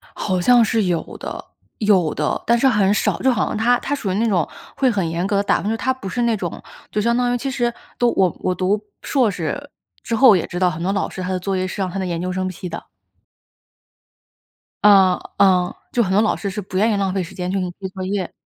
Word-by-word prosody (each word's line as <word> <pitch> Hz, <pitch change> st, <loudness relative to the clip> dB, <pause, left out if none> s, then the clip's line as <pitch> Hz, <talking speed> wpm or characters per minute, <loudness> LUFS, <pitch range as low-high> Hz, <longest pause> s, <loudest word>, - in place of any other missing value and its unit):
好 185 Hz, -3 st, -1 dB
像 240 Hz, +5 st, +5 dB
是 220 Hz, 0 st, +1 dB
有 175 Hz, -3 st, -2 dB
的。 -, -, -6 dB, 0.3 s
有 190 Hz, -7 st, +3 dB
的， 150 Hz, -, -2 dB
但 235 Hz, 0 st, +3 dB
是 270 Hz, -, +3 dB
很 210 Hz, -6 st, +3 dB
少， -, -, 0 dB
就 265 Hz, -, +4 dB
好 240 Hz, -, +1 dB
像 -, -, -3 dB
她 245 Hz, +3 st, +3 dB
她 285 Hz, -, -2 dB
属 215 Hz, -9 st, -3 dB
于 -, -, -2 dB
那 225 Hz, +3 st, +1 dB
种 180 Hz, -7 st, +1 dB, 0.3 s
会 265 Hz, -2 st, +3 dB
很 195 Hz, -7 st, -1 dB
严 170 Hz, +2 st, -2 dB
格 200 Hz, -, +1 dB
地 200 Hz, -, +1 dB
打 -, -, +2 dB
分， -, -, -5 dB
就 -, -, 0 dB
是 225 Hz, -, 0 dB
她 260 Hz, +3 st, 0 dB
不 230 Hz, -7 st, -8 dB
是 240 Hz, +6 st, -2 dB
那 235 Hz, -2 st, +2 dB
种 175 Hz, -4 st, -5 dB, 0.3 s
就 210 Hz, -, -1 dB
相 235 Hz, +2 st, +2 dB
当 245 Hz, 0 st, +1 dB
于 245 Hz, -, 0 dB
其 270 Hz, +3 st, -3 dB
实， 240 Hz, -1 st, 0 dB, 0.3 s
都 240 Hz, -1 st, +3 dB
我 185 Hz, -2 st, +2 dB
我 185 Hz, -, 0 dB
读 190 Hz, +3 st, 0 dB, 0.2 s
硕 255 Hz, -7 st, +2 dB
士 195 Hz, -, -4 dB, 0.3 s
之 230 Hz, -, -2 dB
后 235 Hz, -2 st, +7 dB
也 180 Hz, -, +1 dB
知 175 Hz, -, -4 dB
道， 180 Hz, -1 st, +3 dB
很 165 Hz, 0 st, -4 dB
多 190 Hz, +3 st, 0 dB
老 200 Hz, -, -1 dB
师 185 Hz, -, -7 dB
他 180 Hz, -, -4 dB
的 185 Hz, -, 0 dB
作 190 Hz, +1 st, -2 dB
业 185 Hz, 0 st, -1 dB
是 200 Hz, -, -6 dB
让 190 Hz, -, 0 dB
他 180 Hz, -, -7 dB
的 190 Hz, -, -1 dB
研 170 Hz, -2 st, -3 dB
究 185 Hz, +1 st, -2 dB
生 185 Hz, 0 st, -2 dB
批 185 Hz, 0 st, -7 dB
的。 165 Hz, -, -7 dB, 2.0 s
嗯 195 Hz, -3 st, +6 dB, 0.2 s
嗯， 185 Hz, -2 st, +3 dB, 0.2 s
就 240 Hz, -, +3 dB
很 190 Hz, -, -1 dB
多 200 Hz, -, +4 dB
老 215 Hz, -, +1 dB
师 200 Hz, -, -4 dB
是 195 Hz, +2 st, -4 dB
不 185 Hz, -1 st, -7 dB
愿 215 Hz, +3 st, +3 dB
意 -, -, +1 dB
浪 195 Hz, -2 st, 0 dB
费 190 Hz, -1 st, -1 dB
时 170 Hz, -, -9 dB
间 180 Hz, 0 st, -3 dB
去 195 Hz, -, -1 dB
给 185 Hz, -, -1 dB
你 180 Hz, -, -4 dB
批 190 Hz, -, -5 dB
作 185 Hz, 0 st, -6 dB
业， 190 Hz, -2 st, -3 dB
195 Hz, 290 characters per minute, -20 LUFS, 185-225 Hz, 2.0 s, 后